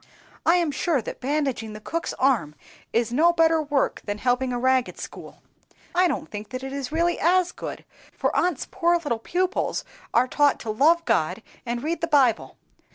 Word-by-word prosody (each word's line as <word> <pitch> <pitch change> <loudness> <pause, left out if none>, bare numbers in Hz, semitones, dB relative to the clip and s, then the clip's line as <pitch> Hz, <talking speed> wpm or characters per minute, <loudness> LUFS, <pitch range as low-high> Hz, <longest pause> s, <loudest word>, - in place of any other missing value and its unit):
I 335 - +6
am 340 -4 +1
sure 295 +1 0
that 225 - -7
bandaging 265 -5 -1
the 215 - -8
cook's 330 +10 -4
arm 240 - +1 0.4
is 230 0 0
no 325 +6 +5
better 325 -1 +3
work 290 -2 0
than 205 0 -3
helping 250 +2 0
a 245 - -1
ragged 260 0 +1
school; - - -10 0.5
I 360 +1 +4
don't 305 - -3
think 210 -1 -7
that 255 0 -6
it 270 0 -5
is 280 -1 -4
really 340 +2 +1
as 360 +1 +3
good, - - -7 0.3
for - - -2
aunt's 355 -5 0
poor 345 +1 +2
little 290 -9 -2
pupils 365 - -1 0.3
are 245 +2 +3
taught 290 +2 +2
to 220 - -3
love 325 +9 +3
God - - 0 0.2
and 240 +1 -2
read 330 +2 -2
the 335 - 0
Bible. 265 -8 +2
280 Hz, 185 wpm, -24 LUFS, 245-335 Hz, 0.5 s, I